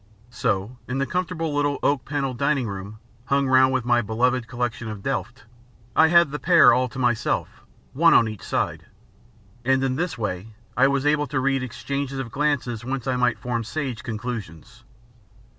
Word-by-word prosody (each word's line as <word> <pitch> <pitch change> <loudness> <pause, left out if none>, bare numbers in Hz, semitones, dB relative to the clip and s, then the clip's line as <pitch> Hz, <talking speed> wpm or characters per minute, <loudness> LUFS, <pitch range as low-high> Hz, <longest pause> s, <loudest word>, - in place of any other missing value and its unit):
So, 105 0 -2
in 125 - -3
the 135 - +1
comfortable 165 0 -2
little 145 0 +1
oak 140 -2 +1
panelled 135 -4 -3
dining 140 -3 +1
room, 100 +1 -7 0.3
hung 140 0 +1
round 130 0 +5
with 130 -3 -1
my 120 -1 +3
beloved 120 +2 0
collection 120 -1 -3
of 105 -2 -7
Delft, 125 -2 -3 0.5
I 160 - +6
had 170 -2 +5
the 150 - -4
pair 170 -1 +6
all 125 0 +1
to 120 - -11
myself, 120 -3 -1 0.3
one 165 +5 +5
on 115 - +5
each 110 -2 -7
side; - - -2 0.8
and 130 +2 +2
in 130 -1 0
this 175 +1 -2
way 105 0 -4 0.2
I 135 +2 +5
was 140 0 0
able 150 0 +2
to 135 0 -1
read 135 0 +1
exchanges 130 +3 -4
of 130 -4 -5
glances 140 -5 -1
whence 130 0 -4
I 130 - 0
might 125 -1 +1
form 120 -2 -3
sage 130 -2 -4
conclusions. 115 -2 -7
130 Hz, 175 wpm, -24 LUFS, 120-140 Hz, 0.8 s, I